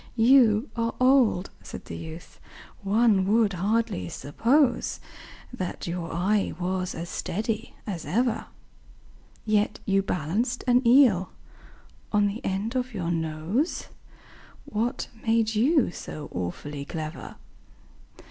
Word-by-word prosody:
"You 235 0 +5
are 230 -1 -1
old," 255 -8 +3
said - - -9
the - - -7
youth, 160 +1 -9 0.4
"one 205 0 +3
would 215 -1 +3
hardly 190 - 0
suppose 240 - +1 0.5
That 185 -8 -4
your 170 -1 -4
eye 195 +5 0
was 185 0 -2
as 170 +1 -5
steady 220 +6 -3
as 185 -7 -4
ever; 230 - 0 1.0
Yet 215 0 +1
you 195 -1 +3
balanced 195 - -1
an 250 -1 +4
eel 235 -8 +5 0.8
on 205 -1 +3
the 205 +3 -3
end 200 +6 -2
of 250 -2 -2
your 170 -3 -2
nose 165 - -1 0.8
What 235 +5 -2 0.2
made 225 -1 +2
you 255 - +3
so 150 -3 -8
awfully 140 +12 -5
clever?" 155 +2 -6
210 Hz, 115 wpm, -26 LUFS, 175-235 Hz, 1.0 s, You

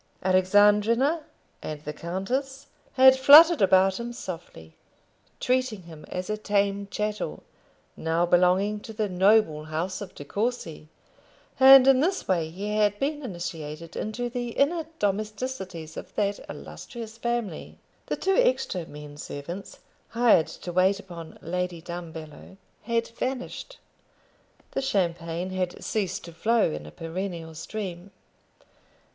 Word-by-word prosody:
Alexandrina 205 - +4 0.4
and 150 -1 -6
the 150 0 -6
countess 255 - -3 0.3
had 260 0 +7
fluttered 300 +4 +8
about 190 0 +4
him 235 0 -4
softly, 165 - -8 0.7
treating 250 -6 0
him 160 -3 -12
as 180 0 -4
a 215 - -2
tame 200 -1 0
chattel, 210 +1 -3 0.5
now 165 +2 0
belonging 180 +4 +3
to 220 - -10
the 215 0 -1
noble 185 -4 +3
house 165 +6 -3
of 195 -3 -8
De 145 - -9
Courcy, 200 -6 -3 0.7
and 265 0 +9
in 270 -1 +6
this 365 +6 0
way 170 -4 +1
he 205 +5 -4
had 205 -1 +2
been 290 +5 -2
initiated 165 - -6
into 240 +3 -3
the 245 0 -4
inner 315 +3 +1
domesticities 205 - -3
of - - -9
that 205 -1 0
illustrious 230 -2 -9
family. 235 -2 -3 0.3
The - - -1
two 385 0 0
extra - - +1
men 145 0 -10
servants, 170 +7 -8 0.3
hired 230 -9 +4
to 175 - -8
wait 190 +3 +3
upon 170 -5 -10
Lady 180 0 -3
Dumbello, 165 0 -9 0.2
had 230 +1 -1
vanished. 255 - -5 0.9
The - - -2
champagne 175 -6 -1
had 185 -1 -3
ceased 205 -4 -2
to 170 - -10
flow 225 +7 +2
in 75 0 -6
a - - -10
perennial 165 - -5
stream. 180 +2 -6
195 Hz, 130 wpm, -26 LUFS, 170-235 Hz, 0.9 s, and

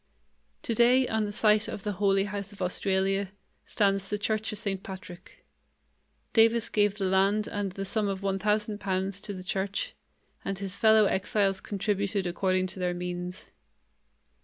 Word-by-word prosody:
Today, 240 +3 +4
on 220 -1 0
the 205 - -4
site 210 0 +3
of 195 - -6
the 210 - -1
"Holy 195 -1 +4
House 200 0 -5
of 200 - -14
Australia", 190 +1 0 0.4
stands 195 -2 +1
the 210 - -1
church 215 +2 -1
of 210 - -6
St. 200 -3 -3
Patrick. 185 -2 -11 0.9
Davis 225 0 +4
gave 205 -1 +2
the 195 - -1
land 195 +3 +2
and 205 -4 -3
the 195 +1 -4
sum 205 +2 0
of 195 0 -3
one 195 -1 0
thousand 210 +1 0
pounds 195 0 -2
to 205 - -6
the 185 -2 -7
church, 195 +1 -2 0.5
and 195 -1 -3
his 195 -1 -5
fellow 220 +1 +5
exiles 195 0 +1
contributed 200 -1 -1
according 185 +1 +1
to 190 +1 -7
their 180 -1 0
means. 180 +1 -5
200 Hz, 160 wpm, -28 LUFS, 190-210 Hz, 0.9 s, fellow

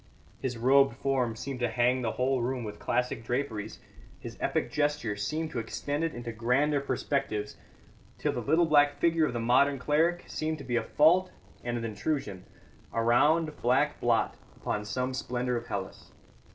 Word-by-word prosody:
His 125 -2 -2
robed 135 +1 +4
form 130 -5 0
seemed 135 +3 -5
to 120 -1 0
hang 125 +2 +2
the 115 -2 -1
whole 130 0 +1
room 125 0 -2
with 105 -1 -7
classic 125 -2 -1
draperies; 115 -4 -3 0.4
his - - -8
epic - - -1
gesture 145 -8 0
seemed 155 +10 -3
to 120 - -2
extend 145 +6 -3
it 165 - -2
into 120 -1 -5
grander 130 +6 +1
perspectives, 130 -6 -2 0.6
till - - 0
the - - -3
little 160 +4 +3
black 145 -2 +4
figure 165 0 +3
of - - -4
the 120 - -2
modern 130 +5 +3
cleric 160 +6 +1
seemed 155 0 -3
to 140 - -9
be 125 -2 -2
a 120 - 0
fault 175 +9 +4 0.3
and 120 0 -2
an 115 - -4
intrusion, 105 -3 -3 0.5
a 115 - 0
round, 150 +7 +3
black 135 +5 +2
blot 120 -1 +2 0.2
upon 105 0 -3
some 125 +5 -2
splendour 125 -1 -2
of 120 - -4
Hellas. - - -6
130 Hz, 175 wpm, -29 LUFS, 115-145 Hz, 0.6 s, robed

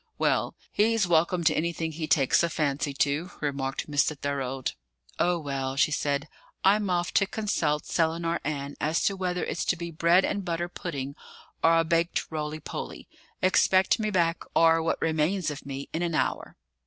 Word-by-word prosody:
"Well, - - +1 0.2
he's 225 0 +2
welcome 170 +1 +2
to - - +4
anything 165 0 -1
he 155 0 -4
takes 135 -4 +4
a 170 - +1
fancy 145 -3 -1
to," 145 +5 0
remarked 140 -2 -2
Mr. 145 0 +1
Thorold. 135 -2 -3 0.5
"Oh, 175 0 +2
well!" 135 -4 -3
she 145 - +3
said. 145 0 -1 0.4
"I'm 200 +1 +3
off 175 -1 0
to 200 - +3
consult 165 -9 -1
Selinar 165 0 0
Ann 140 -1 -3
as 155 +2 +1
to 200 - +2
whether 180 -2 -2
it's - - -2
to - - +2
be 170 0 -6
bread 170 +3 +4
and 200 - -2
butter 175 0 -2
pudding 140 -6 -5 0.5
or 165 0 +5
a 165 - +4
baked 165 +1 0
roly 155 0 -3
poly; - - -7 0.4
expect 185 +2 +4
me 215 -1 0
back, 170 -4 +1
or 165 0 +5
what 160 - -1
remains 160 +2 0
of 140 -1 -8
me, 140 0 -5
in 165 - -1
an 170 -2 -1
hour." - - -1
165 Hz, 175 wpm, -27 LUFS, 145-175 Hz, 0.5 s, or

